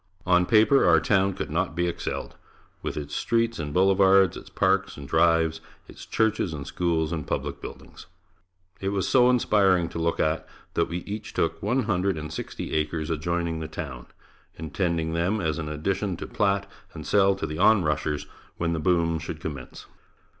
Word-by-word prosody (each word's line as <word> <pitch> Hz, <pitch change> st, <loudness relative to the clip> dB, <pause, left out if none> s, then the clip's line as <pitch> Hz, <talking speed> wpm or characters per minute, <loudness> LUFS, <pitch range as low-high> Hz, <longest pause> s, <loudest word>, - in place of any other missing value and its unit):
On 90 Hz, -1 st, +3 dB
paper 115 Hz, +5 st, +5 dB
our 80 Hz, -2 st, +6 dB
town 95 Hz, +4 st, +2 dB
could -, -, -5 dB
not 85 Hz, +1 st, -1 dB
be 85 Hz, 0 st, +1 dB
excelled, 85 Hz, -, -4 dB, 0.5 s
with -, -, -4 dB
its 75 Hz, -1 st, -5 dB
streets 115 Hz, -2 st, 0 dB
and 75 Hz, -2 st, -4 dB
boulevards, 95 Hz, +1 st, +4 dB
its -, -, -10 dB
parks -, -, +1 dB
and 70 Hz, -1 st, -8 dB
drives, 80 Hz, 0 st, +2 dB, 0.3 s
its -, -, -12 dB
churches 110 Hz, -6 st, 0 dB
and 70 Hz, -2 st, -6 dB
schools 85 Hz, -3 st, -1 dB
and 80 Hz, -3 st, -4 dB
public -, -, -3 dB
buildings. -, -, -10 dB, 0.7 s
It 95 Hz, -, -2 dB
was 100 Hz, -1 st, -1 dB
so 125 Hz, -1 st, +5 dB
inspiring 100 Hz, -8 st, +3 dB
to -, -, -6 dB
look 85 Hz, 0 st, 0 dB
at, 80 Hz, +1 st, 0 dB, 0.3 s
that -, -, +1 dB
we 85 Hz, +1 st, -4 dB
each 105 Hz, +1 st, -6 dB
took 80 Hz, 0 st, -1 dB
one 125 Hz, +6 st, +1 dB
hundred 95 Hz, -4 st, 0 dB
and 75 Hz, 0 st, -6 dB
sixty -, -, -6 dB
acres 80 Hz, +1 st, -1 dB
adjoining 85 Hz, +1 st, -1 dB
the 80 Hz, -, -4 dB
town, 70 Hz, -6 st, -7 dB, 0.5 s
intending 80 Hz, 0 st, -2 dB
them 90 Hz, +6 st, 0 dB
as 80 Hz, -2 st, -1 dB
an 75 Hz, -2 st, -4 dB
addition 95 Hz, +5 st, -2 dB
to -, -, -6 dB
plat 100 Hz, -1 st, 0 dB, 0.3 s
and -, -, -7 dB
sell 100 Hz, -1 st, +4 dB
to 95 Hz, -, -4 dB
the 75 Hz, +1 st, -5 dB
on 105 Hz, 0 st, +5 dB
rushers 75 Hz, -1 st, -1 dB, 0.3 s
when 85 Hz, 0 st, 0 dB
the 80 Hz, -, -1 dB
boom 85 Hz, 0 st, +1 dB
should 80 Hz, -1 st, -6 dB
commence. 70 Hz, -5 st, -7 dB
85 Hz, 180 wpm, -26 LUFS, 80-95 Hz, 0.7 s, our